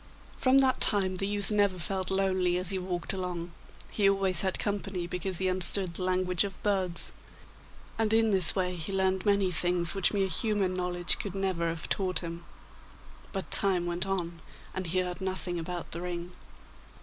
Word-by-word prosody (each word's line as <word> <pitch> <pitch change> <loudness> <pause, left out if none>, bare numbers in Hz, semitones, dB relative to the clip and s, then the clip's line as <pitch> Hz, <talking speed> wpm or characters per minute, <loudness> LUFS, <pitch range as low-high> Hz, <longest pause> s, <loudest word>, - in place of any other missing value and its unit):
From 260 +1 +3
that 265 -1 +3
time 190 -3 +4
the 195 - -2
youth 205 0 0
never 205 -3 +2
felt 185 +2 -3
lonely 190 -2 +1
as 180 +1 -1
he 190 - -1
walked 180 -1 -4
along; 180 -2 -4 0.4
he 200 -2 +3
always 195 -3 +4
had 190 -1 0
company, 195 -3 -3
because 180 +1 -3
he 190 - +1
understood 185 0 -1
the 175 - -2
language 185 -1 +1
of 195 -2 -7
birds; 190 -4 -1 0.9
and 220 -1 +2
in 225 0 +3
this 185 -4 +2
way 180 -2 0
he 165 +2 -5
learned 190 0 0
many 200 -2 +2
things 175 0 0
which 195 -3 +2
mere 195 -2 0
human 195 +1 +1
knowledge 180 -1 -1
could 195 -2 -5
never 190 -3 -1
have 165 0 -5
taught 185 -4 -1
him. 170 0 -7 0.9
But 195 -2 -6
time 185 -3 +7
went 175 +2 -2
on, 170 -3 -3 0.3
and 185 -1 -4
he 185 +3 +1
heard 180 +1 -5
nothing 185 -2 -3
about 175 +1 -5
the 170 - -5
ring. 175 0 -5
185 Hz, 180 wpm, -29 LUFS, 175-195 Hz, 0.9 s, time